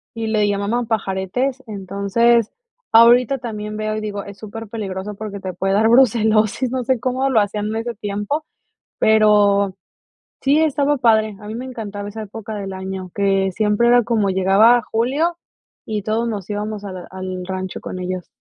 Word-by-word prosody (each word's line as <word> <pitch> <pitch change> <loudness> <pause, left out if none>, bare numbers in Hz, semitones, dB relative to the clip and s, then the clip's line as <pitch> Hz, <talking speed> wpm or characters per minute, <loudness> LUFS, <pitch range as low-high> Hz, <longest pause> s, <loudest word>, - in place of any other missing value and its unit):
y 225 -1 -3
le 215 -1 +2
llamaban 205 +4 -1
pajaretes. 225 +5 -1
Entonces, 205 +3 +1 0.4
ahorita 240 +4 +6
también 215 -3 -6
veo 215 0 -2
y - - -3
digo, 205 -1 -4
es 200 0 -11
superpeligroso 210 -2 -6
porque 200 -1 -7
te 185 -1 -5
puede 195 +2 -1
dar 220 +3 +3
brucelosis, 225 -1 +3
no 260 -1 -1
sé 255 -1 +1
cómo 260 +2 0
lo 230 -5 +4
hacían 205 +1 -2
en 215 - -3
ese 230 +1 -3
tiempo, 205 +9 -3 0.5
pero 205 -3 +4 0.7
sí, 285 +3 +3
estaba 290 -2 +2
padre. 220 -3 +3
A 210 - -10
mí 220 - -5
me 250 - -5
encantaba 210 -5 -6
esa 220 +2 -6
época 215 +1 -7
del 195 -2 -5
año, 190 -1 -6
que 195 -1 +2
siempre 210 +3 +2
era 245 -1 +5
como 220 -5 +1
llegaba 195 +5 +5
a 240 - 0
julio 275 +11 0 0.5
y 215 -2 -3
todos 225 +3 -1
nos 205 -4 -5
íbamos 210 0 -4
a 195 - -6
la 180 -1 -9
al 185 -1 -5
rancho 190 0 -5
con 185 - -6
ellos. 180 -1 -4
215 Hz, 175 wpm, -20 LUFS, 200-235 Hz, 0.7 s, ahorita